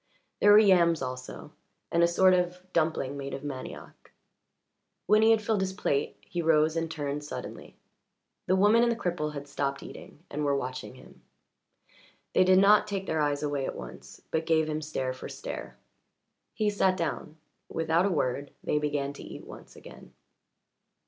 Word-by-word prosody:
There 205 - +6
were - - +9
yams 175 -7 +5
also 130 0 -7 0.4
and 170 - +2
a 170 - +6
sort 185 +2 +4
of 180 0 0
dumpling 155 -4 0
made 140 0 -5
of 135 - -8
manioc. 140 -3 -8 0.9
When 215 +1 +4
he 220 - +5
had 225 -1 +4
filled 210 -2 0
his 190 0 -1
plate 140 -7 -1
he 175 - -3
rose 155 -1 +3
and 165 0 -1
turned 145 -2 -4
suddenly; 145 - -8 0.7
the 185 - +3
woman 205 +4 +5
and 240 0 +3
the - - 0
cripple 175 -8 -2
had 140 0 -6
stopped 140 -1 -3
eating 155 - -12
and 150 +1 -3
were 140 -1 +2
watching 130 -1 -5
him. - - -17 1.1
They 185 - +5
did 185 0 +5
not 205 +2 +5
take 195 -2 -3
their 160 -3 -1
eyes 145 0 0
away 145 -2 -1
at - - -5
once - - -10
but 160 0 -1
gave 160 -1 +3
him 155 0 -2
stare 135 -4 -3
for 130 - -9
stare. - - -7 0.8
He 210 -1 +1
sat 190 -2 +2
down; 160 -2 -4 0.3
without 165 +3 +1
a - - 0
word 140 -4 -1
they 150 - +1
began 145 -1 -2
to - - -11
eat - - -10
once - - -12
again. - - -14
160 Hz, 175 wpm, -28 LUFS, 145-185 Hz, 1.1 s, were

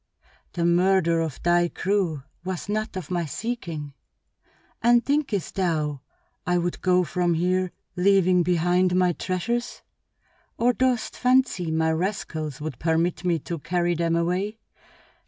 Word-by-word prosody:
"The 170 -1 -1
murder 175 -1 +3
of 160 -4 -4
thy 175 0 +3
crew 175 -6 -1 0.2
was 185 -1 -4
not 215 -1 -2
of 185 -2 -7
my 175 -2 0
seeking. 160 - -5 0.9
And 240 0 +4
thinkest 280 - 0
thou 155 -7 -1 0.4
I 180 0 +1
would 175 0 -2
go 180 -1 +3
from 175 +1 0
here 180 +2 +1 0.2
leaving 185 -1 +4
behind 180 +1 +2
my 180 -1 +3
treasures? 235 +9 -3 0.7
Or 245 +1 +3
dost 250 -2 0
fancy 250 -9 +2
my 160 0 +1
rascals 160 -5 -3
would 150 -4 -6
permit 165 0 0
me 175 -2 +2
to 170 +1 -5
carry 175 +2 0
them 165 0 0
away? 180 +6 -1
180 Hz, 135 wpm, -25 LUFS, 165-195 Hz, 0.9 s, And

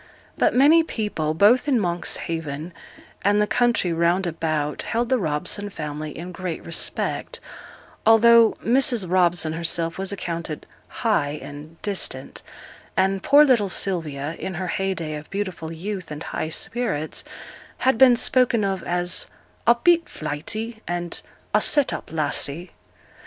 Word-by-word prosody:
But - - +2
many 295 +6 +6
people, 210 - -2
both 225 - +4
in 265 -5 +3
Monkshaven 165 -3 -3 0.5
and 205 +1 +3
the 210 - +3
country 235 -6 +1
round 170 +3 +2
about, 155 -3 -2
held 235 +1 -1
the 260 -1 +2
Robson 180 +5 -2
family 150 -4 -6
in 175 +3 -7
great 180 -1 -5
respect, 170 - -3 0.6
although 230 0 +6
Mrs. 240 -4 +3
Robson 175 -3 +2
herself 165 +1 -1
was 195 0 -2
accounted 170 -5 -5 0.2
'high' 150 -11 0
and 150 +3 -10
'distant;' 185 -10 -2 0.6
and 195 0 +2
poor 290 +1 +6
little 235 -8 +3
Sylvia, 160 -6 -1
in 190 - -4
her 180 +1 -3
heyday 185 -5 -2
of 150 0 -8
beautiful 185 -5 -4
youth 185 +2 -5
and 150 +1 -6
high 155 - -4
spirits, 160 -5 -2 0.5
had 260 -3 +1
been 255 -2 +8
spoken 240 -2 +2
of 195 -2 -1
as 175 +1 -1 0.4
'a 235 - +7
bit 335 +7 +3
flighty,' 215 +10 -5
and 175 0 -3 0.3
'a - - +4
set 290 -3 +3
up - - -6
lassie.' 160 +2 -2
180 Hz, 135 wpm, -23 LUFS, 160-225 Hz, 0.6 s, been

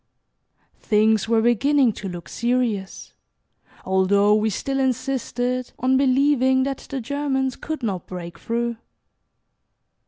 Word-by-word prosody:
Things 220 0 +2
were 225 -1 +3
beginning 250 +1 +3
to 195 - -6
look 175 -2 -8
serious, 235 -5 -2 0.7
although 200 +2 +3
we 215 +1 +2
still 270 +6 -2
insisted 255 -1 -2
on 260 +1 +2
believing 260 -1 +3
that 275 0 -4
the 275 - -3
Germans 265 0 -1
could 310 -4 -6
not 195 -5 -3
break 175 -2 -8
through. 235 0 -2
245 Hz, 115 wpm, -22 LUFS, 210-265 Hz, 0.7 s, were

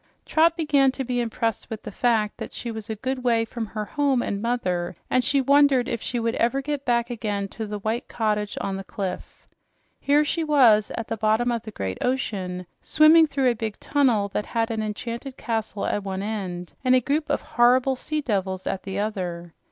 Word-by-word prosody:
Trot 330 +2 +3
began 285 -4 +3
to 270 - -3
be 250 -1 -1
impressed 225 -2 -2
with 220 -2 -6
the - - -6
fact 220 -1 +1
that - - -7
she 235 - -5
was 220 0 -7
a 220 - -2
good 260 +3 -3
way 230 -2 +2
from 225 0 -5
her 215 0 -4
home 275 -1 +1
and 200 0 -3
mother, 180 -8 -1 0.2
and 255 - +3
she 280 +4 +2
wondered 275 -2 +4
if 235 - -2
she 245 - -2
would 230 0 0
ever 240 +4 +2
get 285 0 -3
back 235 -1 +1
again 210 -4 -2
to 220 +1 -6
the 210 0 -4
white 220 +5 -2
cottage 210 -2 -1
on 195 -1 -2
the 195 - -6
cliff. 190 -1 -6 0.5
Here 290 +2 +3
she 325 +3 -1
was, 245 -9 +5
at 230 - -4
the 225 - -3
bottom 220 +3 +2
of 235 -1 -1
the 220 - -9
great 95 - -4
ocean, 190 -8 -2 0.2
swimming 315 +1 +6
through 270 -3 +2
a - - 0
big 220 -2 -5
tunnel 250 -8 +2
that 210 - -3
had 230 0 -1
an 220 -1 -1
enchanted 235 +5 -5
castle 220 -3 -3
at 205 - -1
the 195 - -5
end, 190 -3 -4
and 255 0 +5
a - - +6
group 290 +5 -1
of - - 0
horrible 250 +2 +3
sea 305 +4 -3
devils 190 -7 -2
at 190 - -2
the 195 0 -5
other! 180 -5 -3
230 Hz, 210 wpm, -24 LUFS, 210-260 Hz, 0.5 s, swimming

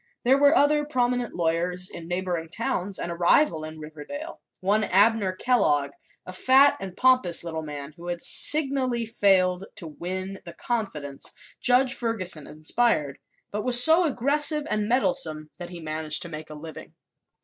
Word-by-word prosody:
There 265 +3 +3
were 285 +2 +4
other 295 -1 +2
prominent 245 -4 -2
lawyers 175 +2 -1
in 165 -2 -10
neighboring 175 -2 -4
towns 200 -2 -3
and 170 - -5
a - - -5
rival 170 - +2
in 155 0 -8
Riverdale 155 - -9 0.2
one 205 +3 +1
Abner 205 0 +2
Kellogg, 185 - 0 0.3
a 185 - -9
fat 265 +8 +4
and 190 -1 -9
pompous 255 -11 +3
little 160 -2 -5
man 145 -2 -8
who 170 +1 -11
had 175 -1 -4
signally 265 - +3
failed 195 -4 +1
to 170 - -10
win 185 +5 -6
the 170 - -10
confidence 160 - -5 0.3
Judge 250 +1 +2
Ferguson 190 - -2
inspired 155 - -1 0.3
but 210 +1 -4
was 245 -1 +7
so 325 +4 +6
aggressive 295 +2 +2
and 210 -1 -1
meddlesome 245 - -1
that 175 -1 -8
he 175 -1 -9
managed 155 +1 0
to 170 - -9
make 155 -1 -8
a 155 - -9
living. 155 +1 -11
190 Hz, 160 wpm, -24 LUFS, 165-250 Hz, 0.3 s, was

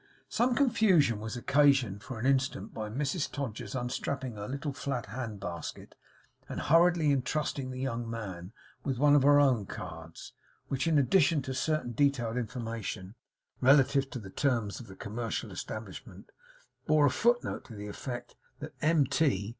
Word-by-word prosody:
Some 240 +2 +2
confusion 205 - +3
was 110 +3 -5
occasioned 135 -6 +3
for 130 - -7
an 110 - -4
instant 135 -6 0
by 110 -1 -4
Mrs 145 - -2
Todgers's 135 -3 -5
unstrapping 130 +1 -3
her 105 -1 -6
little 140 +2 -4
flat 135 -4 -3
hand 110 -1 -5
basket, 90 -3 -6 0.6
and - - -4
hurriedly 165 0 +4
entrusting 140 0 -1
the 130 0 -5
'young 120 -3 -2
man' 95 -5 -6 0.3
with 135 -3 -1
one 145 +2 +5
of 145 - +6
her 145 +1 +6
own 125 -8 +3
cards, 80 0 -8 0.4
which, 135 +3 -1
in 160 -2 +3
addition 150 0 +3
to 130 - -4
certain 155 -2 -1
detailed 120 -2 +1
information 115 -5 -4 0.5
relative 135 +1 +4
to - - -6
the 100 -5 -9
terms 115 -7 0
of 120 - -10
the 95 - -11
commercial 110 +3 -4
establishment, - - -8 0.6
bore 155 -1 +5
a 140 - +4
foot 240 - +2
note - - -4
to 115 - -11
the 105 0 -7
effect 120 +3 -6 0.2
that 150 +1 -8
M. 155 -1 +4
130 Hz, 160 wpm, -30 LUFS, 115-145 Hz, 0.6 s, of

